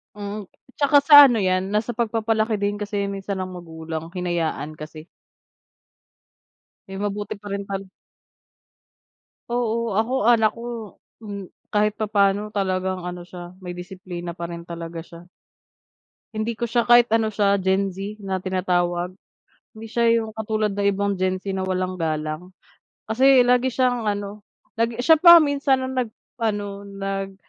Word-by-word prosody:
Mm, 205 0 -6 0.3
tsaka 285 0 +5
sa 290 0 +10
ano 240 -5 +3
'yan, 185 +1 0
nasa 215 +2 -1
pagpapalaki 220 -2 0
din 205 0 0
kasi 205 0 -3
'yan 200 0 -2
minsan 195 0 -4
ng 185 - -3
magulang, 165 -2 -7
hinayaan 170 -4 -2
kasi. 155 +1 -10 1.9
Eh, 195 - -6
mabuti 205 +1 -3
pa 205 - -16
rin 200 0 -2
pala. 195 0 -4 1.6
Oo, 235 -1 0
ako 230 +3 0 0.2
anak 220 -2 +4
ko, 230 -2 -7 0.2
um, 200 -4 -8 0.2
kahit 210 0 +2
papaano 205 -1 +1
talagang 185 -2 -1
ano 175 0 -6
siya, 175 0 -10
may 180 -2 -7
disiplina 180 -1 -7
pa 170 - -3
rin 170 0 -7
talaga 170 -1 -7
siya. 170 0 -13 1.1
Hindi 215 +1 -2
ko 240 - -2
siya 235 0 0
kahit 240 -1 +6
ano 225 -1 +3
siya, 200 -2 +2
Gen-Z 195 +2 -2
na 190 -1 -2
tinatawag, 180 -1 -1 0.6
hindi 225 0 -10
siya 235 +1 0 0.2
yung 220 0 -7
katulad 215 -1 -1
ng 200 - -1
ibang 200 0 -1
Gen-Z 185 +1 -2
na 190 - -2
walang 185 0 -2
galang. 155 +2 -3 0.6
Kasi 260 +2 +6
lagi 250 0 +2
siyang 245 -3 +1
ano, 205 0 -3 0.3
lagi 230 0 +1
siya 320 +4 +6
pa 340 0 +9
ang 290 - +1
minsan 275 -2 +1
nag 255 -2 -1 0.3
ano, 205 -3 -3
nag 195 -1 -4
200 Hz, 145 wpm, -23 LUFS, 185-225 Hz, 1.9 s, sa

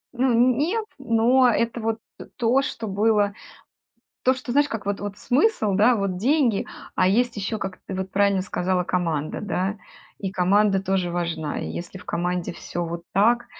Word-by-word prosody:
Ну, 255 +1 +2
н 240 +1 +4
нет, 410 +10 0
но 245 +1 +4
это 235 +1 0
вот 225 0 -1 0.4
то, 245 +3 +3
что 230 -5 -4
было, 205 0 +2 0.9
то, 255 - +4
что, 255 -1 -6
знаешь, 290 +1 +3
как 220 -5 -5
вот 200 0 -2
вот, 205 0 -5
смысл, 250 - +2
да, 225 +4 +4
вот 195 -2 -1
деньги, 250 0 +2 0.3
а 185 - +3
есть 235 +4 +2
еще, 205 +2 -3
как 190 -2 -5
ты - - -6
вот 190 0 -4
правильно 200 -1 +2
сказала, 185 -1 -1
команда, 165 -4 -1
да. 200 0 -2 0.4
И 195 -2 -3
команда 195 +1 +3
тоже 190 -2 0
важна. 165 -3 -2
И - - -4
если 175 +2 -6
в 180 - -14
команде 175 0 -2
всё 175 0 -5
вот 170 +1 -5
так, 235 +5 +3
205 Hz, 175 wpm, -24 LUFS, 185-240 Hz, 0.9 s, н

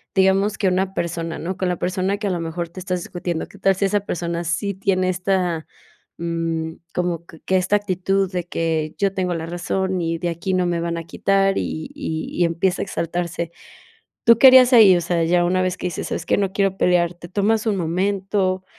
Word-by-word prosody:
digamos 195 +2 +3
que 200 - +1
una 185 +1 0
persona 165 -1 -3
¿no? 185 +3 -4
Con 185 - -1
la 180 - -1
persona 185 +3 -1
que 210 0 -3
a - - 0
lo 175 - -1
mejor 165 +1 -4
te 175 - -10
estás 180 -1 -2
discutiendo, 175 -1 -4
qué - - -16
tal 195 0 +3
si 195 - 0
esa 205 +1 +2
persona 170 -3 -3
sí 170 +5 -1
tiene 185 -1 0
esta, 180 -3 -1 0.5
mm, 165 -1 -2 0.2
como 175 -2 -1
q 165 -1 -15
que 190 - +2
esta 185 +2 +1
actitud 195 -1 -1
de 180 -2 -3
que 160 -2 -2
yo 195 -1 +1
tengo 185 -2 -1
la 165 -1 -4
razón 180 +2 -2
y 165 0 -1
de 175 +1 -2
aquí 170 +3 -3
no 180 -1 +1
me 170 -1 -1
van 170 0 -2
a 165 - -4
quitar 195 +2 +1
y 160 - -4
y 160 - -4
y - - +5
empieza 170 +3 0
a - - 0
exaltarse. 170 -1 -3 0.7
¿Tú 230 -1 +6
que 265 - +9
harías 255 0 +7
ahí? 205 -6 +8
O - - +1
sea, 170 0 0
ya 175 +1 +3
una 185 +1 +1
vez 185 0 -1
que - - -3
dices: 175 - -4
"¿Sabes - - -4
qué? - - +2
No 195 -2 0
quiero 195 -1 +1
pelear", 175 -2 +2
¿te 175 0 -12
tomas 210 +4 +1
un 215 -2 +1
momento, 185 +2 0
180 Hz, 220 wpm, -21 LUFS, 170-195 Hz, 0.7 s, que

